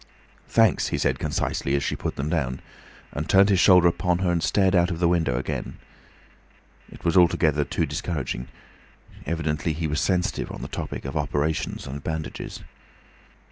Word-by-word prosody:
"Thanks," - - +3
he - - -1
said - - 0
concisely, 70 - -1
as 70 - 0
she - - -1
put - - -4
them 70 - -3
down, 70 -6 -1 0.5
and 75 +1 -5
turned 100 +1 +6
his 95 -3 +3
shoulder 90 -2 +6
upon 90 +1 +1
her 90 -1 0
and 85 -1 0
stared 95 +1 +2
out 90 -1 +4
of 85 - -3
the 85 0 +2
window 80 -8 +1
again. 65 - -4 1.1
It - - -13
was 85 - +2
altogether 80 -4 +4
too 70 - -1
discouraging. 70 -7 -4 0.8
Evidently 80 -1 -1
he 80 +2 -3
was 75 -1 -1
sensitive 90 -2 0
on - - -7
the - - -4
topic - - -5
of 70 +3 -5
operations 75 +1 -1
and 70 0 -7
bandages. 80 -1 -5
80 Hz, 170 wpm, -25 LUFS, 75-90 Hz, 1.1 s, turned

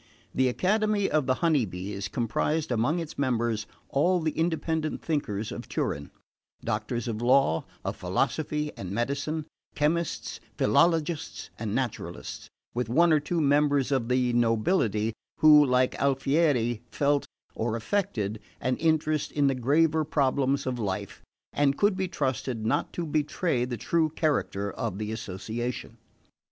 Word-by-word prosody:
The 130 0 +3
Academy 205 - +1
of 155 -4 +1
the 130 - +3
Honey 155 -6 +4
Bees 95 +1 -5
comprised 145 - -1
among 120 +8 +1
its 165 -4 -5
members 115 -5 0 0.2
all 175 +6 +2
the 160 -1 0
independent 160 -1 -1
thinkers 110 -10 -2
of - - -7
Turin: 70 0 -2 0.6
doctors 110 +3 -2
of 115 -1 -3
law, 125 -9 +3 0.2
of - - -3
philosophy 150 -1 -1
and 95 - -6
medicine, 140 - -2 0.3
chemists, 160 +2 -1 0.2
philologists 165 -2 +1
and 110 -1 -2
naturalists, 110 -9 -4 0.2
with 120 -1 -2
one 165 +6 +4
or 155 - +5
two 165 +4 -2
members 145 -2 +3
of 130 -4 +1
the 125 -1 +2
nobility, 115 - +2 0.2
who, 150 -1 +8
like 125 -2 +2
Alfieri, 135 -4 +2
felt, 145 0 +1 0.3
or 115 0 -1
affected, 115 - -1 0.2
an 130 0 0
interest 155 -2 +1
in 145 -1 +1
the 135 - +3
graver 155 +5 +2
problems 140 -2 +1
of 125 -2 -2
life, 100 -4 -3 0.3
and 140 -1 +2
could 205 -1 +3
be 190 0 -1
trusted 130 -8 -2
not 115 - 0
to 175 - -3
betray 150 -3 0
the 125 -1 -4
true 160 +7 +1
character 145 -11 -1
of 110 -6 -4
the 105 +1 -3
association. 110 +3 -5
135 Hz, 140 wpm, -27 LUFS, 115-155 Hz, 0.6 s, who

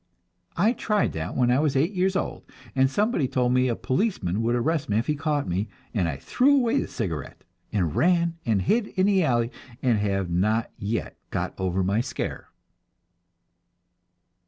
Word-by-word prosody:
I 210 +8 +4
tried 210 -4 0
that 80 +2 -4
when 125 -1 +3
I 125 - +3
was 150 -2 +1
eight 155 +8 +2
years 190 0 +1
old, 195 - -2 0.3
and 130 0 +4
somebody 205 - +1
told 125 -2 +1
me 130 0 +3
a 120 - 0
policeman 130 - -1
would 120 +1 +1
arrest 150 +4 0
me 105 - +2
if 115 - +1
he 150 - +1
caught 145 -4 -1
me, 95 +5 -1 0.3
and 95 -7 +1
I 70 - -4
threw 250 - +3
away 255 0 +2
the - - -2
cigarette, 85 - -5 0.3
and 85 -7 0
ran 170 -1 +3
and 105 -5 +1
hid 220 - +2
in 185 +1 +4
an 195 -2 +4
alley, 120 -6 +1 0.3
and 120 -6 +2
have 100 -2 0
not 105 +6 +1
yet 110 +3 -3
got - - -2
over 95 0 0
my 100 +5 +1
scare. - - -4
125 Hz, 180 wpm, -25 LUFS, 100-170 Hz, 0.3 s, I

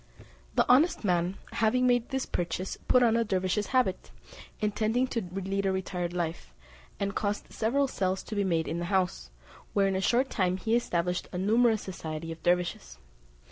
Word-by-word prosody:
The - - +4
honest 285 +6 +4
man 180 -1 +1
having 235 +3 +2
made 245 -1 +2
this 265 -1 -1
purchase 175 +2 -3
put 250 -1 +5
on 230 -1 +4
a 230 - +3
dervise's 190 0 0
habit, 255 -8 0 0.5
intending 215 +4 +1
to 230 - -1
lead 195 +2 -2
a - - +2
retired 180 -2 -2
life, 165 - -4 0.4
and 200 0 -1
caused 205 0 -3
several 275 +6 +1
cells 190 -6 -1
to 215 - -6
be 205 - +1
made 165 -4 0
in 170 - -2
the 175 - -2
house, 180 - 0 0.4
where 200 -1 +3
in 195 - 0
a 190 - 0
short 250 +6 +2
time 185 -3 +1
he 225 +4 0
established 180 -6 0
a 180 - -4
numerous 220 +3 +3
society 165 -3 -6
of 165 - -8
dervises. 175 - 0
195 Hz, 180 wpm, -29 LUFS, 180-225 Hz, 0.5 s, put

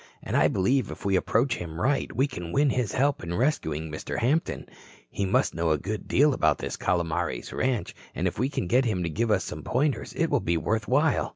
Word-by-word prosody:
And - - -3
I - - +5
believe 125 +8 +1
if - - -9
we 100 -1 +2
approach 120 +7 +1
him 80 -1 -6
right 140 +7 +1
we 135 - +2
can 90 -12 -6
win 140 +4 +3
his 125 -5 -1
help 140 +1 +1
in 85 +1 -3
rescuing 80 - -1
Mr. 75 - -5
Hampton. 145 +8 0 0.5
He 100 - -1
must 125 +8 +2
know 85 0 0
a 80 - +3
good 100 +6 -5
deal 145 +2 +4
about 80 - +2
this - - -4
Calomares 85 -6 -1
ranch 130 -4 -1 0.2
and - - 0
if - - -4
we 130 +3 +1
can 140 - -2
get 125 +9 +3
him 95 -6 0
to 85 - -1
give 115 +8 0
us 95 -4 +2
some 75 - -6
pointers 135 - -1
it - - 0
will - - +3
be 85 0 0
worth 110 +6 -1
while. 145 +4 +2
110 Hz, 225 wpm, -26 LUFS, 85-130 Hz, 0.5 s, I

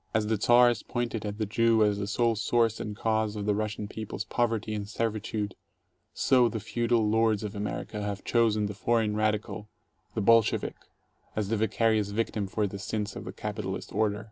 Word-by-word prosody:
As 110 -1 +2
the 110 0 +1
Czars 120 -1 +5
pointed 120 -3 -3
at 105 0 -5
the 110 - -1
Jew 115 +2 +3
as 105 -1 +2
the 100 - -2
sole 115 +2 +2
source 115 +1 +1
and 105 -1 -4
cause 110 -1 0
of 105 -1 -4
the 105 - +2
Russian 105 0 -2
people's 110 0 -5
poverty 115 -2 -1
and 105 -1 -4
servitude, 110 -2 -2 0.6
so 125 -3 +3
the 110 - -3
feudal 115 +1 +1
lords 110 -1 +2
of 105 -1 -4
America 105 0 -4
have 100 -1 -4
chosen 110 -3 +2
the 105 - -3
"foreign 110 0 +1
radical," 105 0 -1 0.5
"the 110 - 0
Bolshevik" 115 +1 +3 0.6
as 105 -2 -1
the 115 - +1
vicarious 110 -1 +1
victim 105 -1 -1
for 105 +2 0
the 100 0 -5
sins 105 0 -3
of - - -7
the - - -5
capitalist - - -5
order. 105 0 +1
110 Hz, 185 wpm, -28 LUFS, 105-115 Hz, 0.6 s, Czars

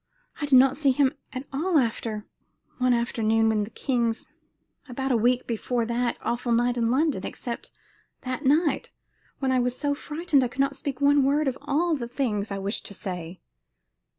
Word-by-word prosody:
I 295 - -3
did 270 -2 +7
not 265 +1 +5
see 290 -3 +2
him 270 +1 +3 0.2
at 255 +1 -6
all 325 +5 +1
after 225 -4 -1 0.5
one 255 0 +3
afternoon 225 -2 +2
in 210 -1 +1
the - - -11
king's 235 -2 -1 0.6
about 265 +2 -2
a - - +4
week 245 +2 +2
before 235 +1 -1
that 240 +1 -1
awful 240 0 -1
night 240 +1 +2
in 230 -2 +1
London, 270 -5 +1
except 240 -1 -6 0.5
that 255 +2 -4
night, 295 +3 +2 0.5
when 265 -1 0
I 255 - +3
was 250 0 0
so 290 -1 0
frightened 295 -1 0
I - - +1
could 250 +3 -13
not 275 0 +2
speak 275 -1 -5
one 285 0 +5
word 285 +2 +2
of 260 - 0
all 315 +4 +1
the 240 -5 -4
things 225 -5 -2
I 200 - -3
wished 195 +2 -3
to 200 - -7
say." 180 -2 -6
250 Hz, 185 wpm, -26 LUFS, 230-280 Hz, 0.6 s, did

